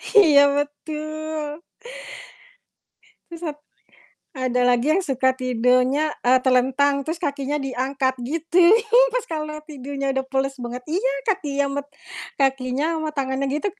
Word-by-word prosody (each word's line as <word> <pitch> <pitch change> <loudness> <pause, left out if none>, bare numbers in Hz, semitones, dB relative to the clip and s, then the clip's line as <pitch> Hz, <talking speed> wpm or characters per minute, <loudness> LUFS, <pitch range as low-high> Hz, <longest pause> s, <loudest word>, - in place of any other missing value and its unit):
Iya 300 -8 +7
betul. 310 +1 -4 1.7
Terus 335 0 -9
1 295 -3 -5
lagi, 295 - -47 0.6
ada 255 -3 -1
lagi 245 +1 +2
yang 385 - +1
suka 260 -4 +1
tidurnya, 255 +4 +1
eee, 255 +1 +5
telentang 265 +2 +2
terus 320 +4 -4
kakinya 285 -1 -2
diangkat 265 0 -1
gitu, 330 +7 +1 0.5
pas - - -2
kalo 305 -3 -4
tidurnya 275 -1 -4
udah 265 - 0
pules 270 0 0
banget 245 +1 -6
iya, 390 +11 0
kakinya 290 -9 0 0.2
met - - -27 0.5
kakinya 270 +3 0
sama 315 -1 -2
tangannya 270 -1 -2
gitu, 300 +8 -2
280 Hz, 125 wpm, -22 LUFS, 260-310 Hz, 1.7 s, Iya